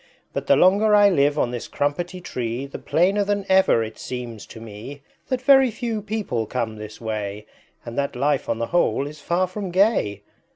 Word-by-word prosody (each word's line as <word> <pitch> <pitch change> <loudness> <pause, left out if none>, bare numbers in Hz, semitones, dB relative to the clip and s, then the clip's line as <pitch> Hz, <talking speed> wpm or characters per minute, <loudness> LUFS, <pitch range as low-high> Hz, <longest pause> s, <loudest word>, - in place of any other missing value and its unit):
But - - -4
the 140 - +6
longer 200 +7 +5
I 205 -1 +6
live 145 -3 +2
on 120 - +1
this 120 -2 -5
Crumpetty 175 +6 -2
Tree 125 -5 -4
The 140 - -8
plainer 195 +5 +2
than 200 0 -1
ever 190 -11 +4
it 110 0 -8
seems 120 -4 -6
to 115 - -11
me 115 +6 -10 0.2
That 255 -1 -2
very 270 -1 +6
few 230 -1 -3
people 200 - -3
come 115 -2 -3
this 105 0 -9
way 105 -2 -4 0.4
And 115 - -7
that 140 -2 -2
life 140 +2 0
on 115 - 0
the 115 - -1
whole 175 -5 +2
is 150 +1 -9
far 175 +5 +1
from 190 +1 -5
gay!" 175 - +1
145 Hz, 195 wpm, -23 LUFS, -, 0.4 s, the